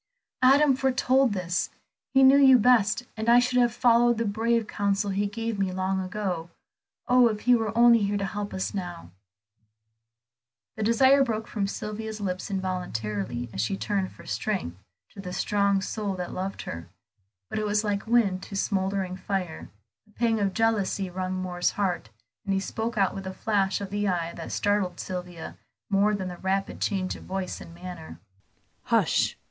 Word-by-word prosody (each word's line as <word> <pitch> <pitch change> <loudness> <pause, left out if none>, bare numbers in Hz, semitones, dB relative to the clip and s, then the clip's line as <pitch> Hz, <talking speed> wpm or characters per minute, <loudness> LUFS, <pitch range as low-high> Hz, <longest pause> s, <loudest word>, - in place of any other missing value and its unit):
"Adam 275 +2 +5
foretold 265 -1 +2
this. 180 -2 -1 0.4
He 270 0 +5
knew 270 +1 +7
you 265 -2 +8
best, 240 -1 +3
and 220 +1 -1
I 240 - +7
should 250 0 +3
have 240 -1 +4
followed 240 0 +4
the 230 - 0
brave 225 +2 +1
counsel 200 -1 -1
he 200 +1 0
gave 225 0 -4
me 190 -1 0
long 190 +1 -1
ago. 185 -3 -3 0.6
Oh, 250 -1 +6
if 215 -2 -2
he 250 - +4
were 225 -3 +1
only 235 -1 +7
here 205 0 0
to 200 - -2
help 205 +1 -4
us 190 - -3
now!" 175 - -6 1.6
The 220 - -6
desire 260 +5 +5
broke 220 -3 -3
from 200 -3 -2
Sylvia's 215 +1 -5
lips 185 -1 -3
involuntarily 120 - -3
as 95 - -2
she 155 - -1
turned 195 -2 -1
for - - -15
strength 190 - -2 0.4
to 195 - -9
the 180 -2 -7
strong 200 +1 +1
soul 205 -1 -3
that 180 -1 -5
loved 190 +1 -4
her. 80 0 -7 0.6
But - - -3
it 215 - -1
was 210 +1 +1
like 205 -1 -2
wind 215 -6 +2
to 200 - -8
smouldering 190 -1 -1
fire; 185 -4 -4 0.4
a - - -24
pang 230 -2 +1
of 195 -2 0
jealousy 205 -4 0
wrung 185 +1 -3
Moor's 180 -1 -1
heart, 185 - -2 0.3
and 195 -1 -1
he - - +1
spoke 225 +3 -4
out 195 -2 +2
with 195 -1 -6
a 190 - -5
flash 200 -3 0
of 200 -1 -6
the 205 0 -1
eye 170 -3 -1
that 165 - -7
startled 200 -3 0
Sylvia 180 -3 -6 0.3
more 205 +2 +3
than 190 -2 -4
the 175 - -8
rapid 195 +1 -2
change 190 -3 -1
of - - -12
voice 190 -1 -4
and - - -11
manner. 175 -2 -9 0.7
"Hush! - - +2
200 Hz, 175 wpm, -26 LUFS, 185-225 Hz, 1.6 s, you